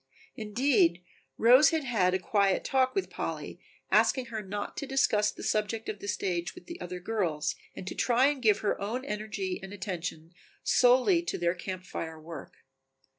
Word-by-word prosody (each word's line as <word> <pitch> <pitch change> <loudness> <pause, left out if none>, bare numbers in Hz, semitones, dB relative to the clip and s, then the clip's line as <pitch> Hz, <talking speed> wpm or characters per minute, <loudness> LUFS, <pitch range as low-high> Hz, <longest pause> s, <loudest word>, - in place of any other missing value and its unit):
Indeed, 210 -6 +2 0.3
Rose 250 +6 +7
had 320 -2 -1
had 190 -8 +2
a - - +3
quiet 195 0 +1
talk 260 -1 +1
with 390 - -1
Polly - - -5 0.3
asking 260 -2 +3
her 220 - -2
not 205 +1 -5
to 280 - -4
discuss 215 -6 +2
the - - -8
subject 215 +1 -1
of 205 - -5
the 200 - -8
stage 180 -4 -2
with 360 - -12
the 340 - -9
other 180 0 -5
girls 175 -7 -1 0.2
and - - -7
to - - -4
try 245 +1 +3
and 285 -2 +1
give 215 -3 +3
her 205 - -1
own 235 +6 -3
energy 210 -5 -3
and 195 0 -9
attention 180 -4 -5 0.3
solely 255 +8 +4
to 345 - -3
their 170 0 +1
Camp 185 +1 -6
Fire 160 -3 -6
work. 160 -2 -9
210 Hz, 175 wpm, -29 LUFS, 180-250 Hz, 0.3 s, Rose